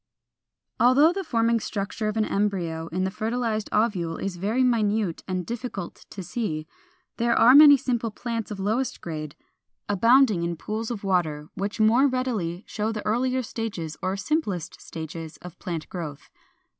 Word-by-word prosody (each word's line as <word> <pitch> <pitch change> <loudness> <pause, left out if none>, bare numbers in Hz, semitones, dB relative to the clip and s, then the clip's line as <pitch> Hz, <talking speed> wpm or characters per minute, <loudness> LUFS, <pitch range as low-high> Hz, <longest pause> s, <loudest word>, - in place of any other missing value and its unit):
] - - -55
400. 245 - +6
Although 290 +6 +5
the 390 +1 -3
forming 230 -6 +2
structure 205 +1 -3
of 215 +1 -2
an 215 - +2
embryo 175 -6 -1
in 180 +3 -2
the 190 - -1
fertilized 220 0 -2
ovule 190 -7 0
is 195 -2 -3
very 215 +8 +1
minute 215 -6 +1
and 185 -2 -2
difficult 235 -6 -6
to 195 - -7
see, 165 -7 -3 0.5
there 235 0 +2
are 235 +3 +7
many 290 0 +10
simple 240 -3 -1
plants 230 +1 -4
of 205 -2 -6
lowest 235 +6 -1
grade, 155 -3 -6 0.5
abounding 225 0 +4
in 170 0 -1
pools 220 +6 -4
of 230 -4 -5
water, 160 -6 0
which 200 +3 -4
more 230 +6 +5
readily 225 -9 -2
show 215 +1 -2
the 215 -2 -5
earlier 255 +4 +1
stages 200 -9 -4
or 190 +1 -1
simplest 200 - -2
states 160 0 -7
of 180 0 -12
plant 165 -3 -4
growth. 155 -6 -7
210 Hz, 165 wpm, -25 LUFS, 180-235 Hz, 0.5 s, many